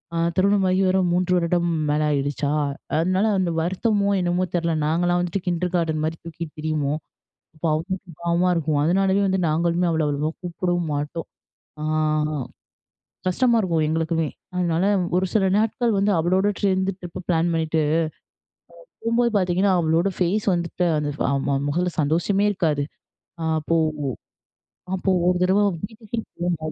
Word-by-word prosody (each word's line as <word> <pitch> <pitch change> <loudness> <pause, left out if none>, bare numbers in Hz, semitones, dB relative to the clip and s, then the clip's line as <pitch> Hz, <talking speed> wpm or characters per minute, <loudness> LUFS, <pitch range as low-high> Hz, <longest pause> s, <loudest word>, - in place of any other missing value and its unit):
அ - - 0 0.2
திருமணம் 200 +1 +3
ஆகி 185 +1 +2
வரும் 185 -1 +2
3 180 +1 +2
வருடம் 175 0 +1 0.2
மேலே 150 +1 +2
ஆயிடுச்சா! 145 0 -1 0.5
அதனால 185 +4 +2
அந்த 180 -2 0
வருத்தமோ 200 +3 +1
என்னமோ 175 +1 +1
தெர்ல 170 -1 0
நாங்கலாம் 175 +3 +1
வந்துட்டு 180 +2 -2
கிண்டர் 180 +1 -1
கார்டன் 160 -3 0
மாரி 160 0 -3
தூக்கிட்டு 165 -1 -7
திரியுவோம். 155 -1 -1 0.6
அப்போ 165 - -3
அவளுக்கு 180 +3 -4
பாவமா 170 +1 +2
இருக்கும். 155 -2 0
அதனாலவே 195 +3 +2
வந்து 190 0 +1
நாங்களுமே 170 +3 +1
அவள 160 -1 +1
அவ்வளவா 150 +2 -1
கூப்பிடவும் 175 -1 -2
மாட்டோம். 150 +3 -4 0.5
அ - - -3 1.5
கஷ்டமா 235 +6 +3
இருக்கும் 165 -5 +1
எங்களுக்குமே. 160 0 0 0.3
அதனால 175 0 +1 0.3
ஒரு 185 - +2
சில 205 -3 +3
நாட்கள் 225 +2 +1
வந்து 200 +1 +2
அவளோட 185 +4 +2
சேர்ந்து 190 -1 +2
ட்ரிப் 175 -1 -7
பிளான் 170 0 +2
பண்ணிட்டு, 160 -1 +1 1.2
போம்போது 235 +1 +2
பார்த்தீங்கன்னா 185 +1 +2
அவளோட 165 +4 +2
ஃபேஸ் 190 +4 +1
வந்துட்டு 175 +1 -1
அந்த 145 -1 -1 0.2
அ - - +1 0.4
முகத்துல 175 +3 0
சந்தோஷமே 175 +7 +1
இருக்காது. 155 -7 0 0.8
அப்போ 165 +2 -1 1.2
அப்போ 190 +1 0 0.2
ஒரு 180 0 +3
தடவ 190 +3 +3 0.2
வீட்டுக்கே 220 +1 -8 0.2
போனோம். 165 -3 -1
175 Hz, 135 wpm, -23 LUFS, 160-190 Hz, 1.5 s, திருமணம்